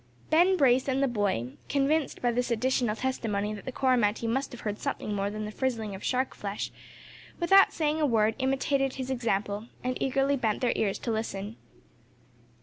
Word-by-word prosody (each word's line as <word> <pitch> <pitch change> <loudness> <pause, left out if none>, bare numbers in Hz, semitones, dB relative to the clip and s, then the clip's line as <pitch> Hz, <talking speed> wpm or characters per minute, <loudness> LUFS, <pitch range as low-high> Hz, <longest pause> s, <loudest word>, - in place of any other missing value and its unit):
Ben 355 +4 +5
Brace 260 -3 +4
and 270 0 +1
the - - +3
boy, 200 - -1 0.2
convinced 285 +1 0
by 240 - +3
this 245 +1 -1
additional 240 -1 +1
testimony 215 -5 -2
that 205 - -9
the 260 - -4
Coromantee 240 -4 +1
must 265 +4 -1
have 245 - -9
heard 210 -1 -3
something 210 - -3
more 200 0 -1
than 215 +1 -4
the 210 - -5
frizzling 225 -4 -2
of 190 - -8
the - - -7
shark 260 +1 0
flesh, 200 0 -4 0.7
without 390 +3 +6
saying 310 0 0
a 300 - +3
word, 220 -3 +3
imitated 270 0 +1
his 265 0 -4
example, 210 -3 -1 0.2
and 255 0 -1
eagerly 270 +1 +2
bent 225 -5 0
their 245 - +2
ears 200 -3 0
to 235 - -3
listen. 220 -1 -3
245 Hz, 185 wpm, -28 LUFS, 210-270 Hz, 0.7 s, without